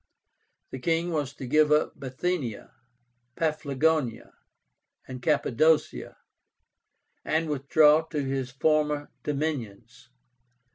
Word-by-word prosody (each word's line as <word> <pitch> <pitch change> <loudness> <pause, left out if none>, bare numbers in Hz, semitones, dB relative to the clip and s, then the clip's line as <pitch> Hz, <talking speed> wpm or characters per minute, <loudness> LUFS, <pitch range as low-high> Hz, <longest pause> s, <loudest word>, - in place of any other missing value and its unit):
The 130 - -6
king 165 +5 0
was 145 -4 -2
to 135 - -7
give 150 +3 +3
up 150 0 +1
Bithynia, 135 -2 -4 0.6
Paphlagonia, 155 -4 -1 0.7
and 130 -1 -8
Cappadocia, 150 +2 +1 1.1
and 160 +1 0
withdraw 150 +2 +4
to 150 -3 -3
his 135 -1 -2
former 150 +1 0
dominions. 125 -6 -4
150 Hz, 90 wpm, -27 LUFS, 130-155 Hz, 1.1 s, withdraw